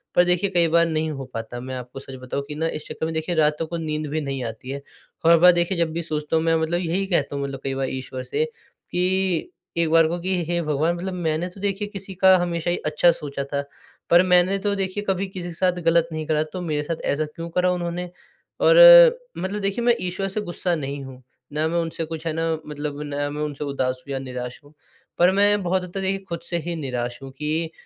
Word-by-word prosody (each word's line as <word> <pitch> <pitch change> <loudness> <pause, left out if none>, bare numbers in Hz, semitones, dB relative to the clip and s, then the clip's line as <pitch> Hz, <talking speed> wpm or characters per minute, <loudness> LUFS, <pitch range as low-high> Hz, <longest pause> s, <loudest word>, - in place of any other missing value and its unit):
पर 175 - +6
देखिए 180 +2 +2
कई 175 -3 +3
बार 170 +1 +4
नहीं 160 -1 -1
हो 135 -2 -6
पाता 115 +1 -5
मैं 130 +1 -6
आपको 125 +1 -7
सच 135 0 -9
बताऊँ 130 +2 -3
कि 150 - -6
ना 160 +2 0
इस 155 -2 -5
चक्कर - - -4
में 160 - -3
देखिए 160 +2 -1
रातों 155 0 +2
को 170 +2 -4
नींद 155 -1 -3
भी 155 +2 -1
नहीं 135 -3 -3
आती 115 +3 -7
है। 140 +1 -4 0.4
और 165 - +7
हर 170 - +8
बार 180 +2 +8
देखिए 175 +1 +1
जब 170 -1 +1
भी 170 - -2
सोचता 155 -1 -2
हूँ 160 - +2
मैं 165 0 +3
मतलब 165 +2 0
यही 180 +3 -1
कहता 150 -7 0
हूँ 140 - -2
मतलब 135 -1 -5
कई 135 - -1
बार 135 0 -1
ईश्वर 130 -1 -5
से 450 - 0
कि, 185 - -2 0.3
एक 170 -1 +2
बार 165 0 +5
को 170 +2 -2
कि 180 0 0
हे 170 0 0
भगवान 155 +2 0
मतलब 185 +2 -4
मैंने 165 -1 -1
तो 180 - -15
देखिए 200 +1 -1
किसी 195 -1 -7
का 190 0 +8
हमेशा 175 -1 -1
ही 175 - 0
अच्छा 155 +3 +4
सोचा 145 -4 -4
था, 140 +1 -2 0.5
पर 175 +1 +7
मैंने 180 +1 +4
तो 205 +1 0
देखिए 195 +1 -2
कभी 195 +1 0
किसी 185 -2 -6
के - - -7
साथ 180 +1 0
गलत 165 0 +3
नहीं 155 0 -4
करा, 155 -1 +2
तो 170 +4 -7
मेरे 150 -4 -1
साथ 165 +2 -4
ऐसा 155 +2 0
क्यों 165 +3 -8
करा 180 +2 +1
उन्होंने? 175 0 -3 0.5
और - - +6 0.6
मतलब 200 +3 -3
देखिए 200 +4 -1
मैं 240 -1 +5
ईश्वर 185 +2 -2
से 195 +2 -3
गुस्सा 175 -2 -2
नहीं 140 -2 -4
हूँ, 130 -1 -11 0.3
ना 155 +1 +1
मैं 170 +1 0
उनसे 165 0 -3
कुछ 160 0 -7
है 160 - 0
ना 165 +1 0 0.2
मतलब 145 -1 -5
ना 145 0 -2
मैं 150 +1 -5
उनसे 150 -1 -3
उदास 130 -2 -2
हूँ - - -6
या 135 - -2
निराश 125 -2 -6
हूँ, 145 +1 -19 0.4
पर 175 +2 +5
मैं 205 0 +3
बहुत 185 +1 0
हद 180 - -8
तक 195 - -3
देखिए 190 +1 0
खुद 170 -1 -3
से 170 - 0
ही 170 - -2
निराश 125 -5 -3
हूँ 135 - -8
कि 155 +2 -2
165 Hz, 245 wpm, -23 LUFS, 145-180 Hz, 0.6 s, हर